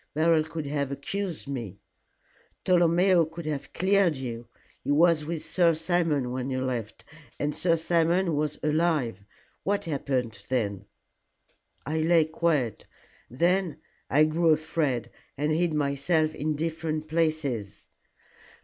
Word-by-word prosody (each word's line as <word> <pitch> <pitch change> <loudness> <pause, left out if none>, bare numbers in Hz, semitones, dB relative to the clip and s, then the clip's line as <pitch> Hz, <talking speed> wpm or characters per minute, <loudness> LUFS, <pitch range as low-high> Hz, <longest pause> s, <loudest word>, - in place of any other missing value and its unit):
Beryl 160 0 +3
could 160 -1 -6
have 140 -1 -2
accused 175 +4 -4
me." 115 -8 -5 0.9
"Tolomeo 175 0 +4
could 165 +1 -7
have 150 -3 -4
cleared 190 -2 +3
you. 120 -3 -6 0.4
He - - -6
was 155 +1 +4
with 165 0 -4
Sir 170 -3 +3
Simon 160 -6 0
when 130 +1 -3
you 130 0 -2
left, 120 -4 -4 0.3
and 145 0 -1
Sir 170 -2 +3
Simon 170 +1 +2
was 150 0 -1
alive. 150 - 0 0.4
What 200 +1 -1
happened 130 -9 -2
then?" 100 -6 -1 1.0
"I 155 +3 -1
lay 165 0 +4
quiet. 155 - -1 0.4
Then 175 +6 +1 0.3
I 150 +3 +5
grew 165 +2 +1
afraid, 150 -6 0 0.3
and 150 +2 0
hid 170 +2 +1
myself 150 +2 +1
in 155 +1 -2
different 160 0 -3
places. 155 -11 -1
155 Hz, 125 wpm, -27 LUFS, 135-170 Hz, 1.0 s, I